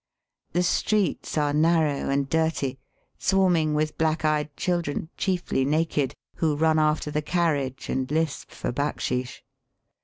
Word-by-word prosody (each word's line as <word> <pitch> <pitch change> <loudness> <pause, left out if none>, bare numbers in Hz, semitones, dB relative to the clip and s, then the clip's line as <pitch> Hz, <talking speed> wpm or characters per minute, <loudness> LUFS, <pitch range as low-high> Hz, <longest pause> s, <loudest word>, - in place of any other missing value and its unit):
The 175 +2 +2
streets 200 0 0
are 145 -1 +2
narrow 155 -2 +2
and 140 0 +1
dirty, 160 -4 0 0.4
swarming 175 -6 +2
with 155 0 -1
black 160 0 +1
eyed 150 -1 0
children, 170 -4 -1
chiefly 180 -8 0
naked, 145 -1 0 0.2
who 155 -3 +1
run 160 +1 +3
after 155 0 +1
the 150 0 0
carriage 145 -6 -1
and 130 0 -1
lisp 155 0 -1
for - - -4
backsheesh. 125 -2 -2
155 Hz, 130 wpm, -25 LUFS, 145-165 Hz, 0.4 s, run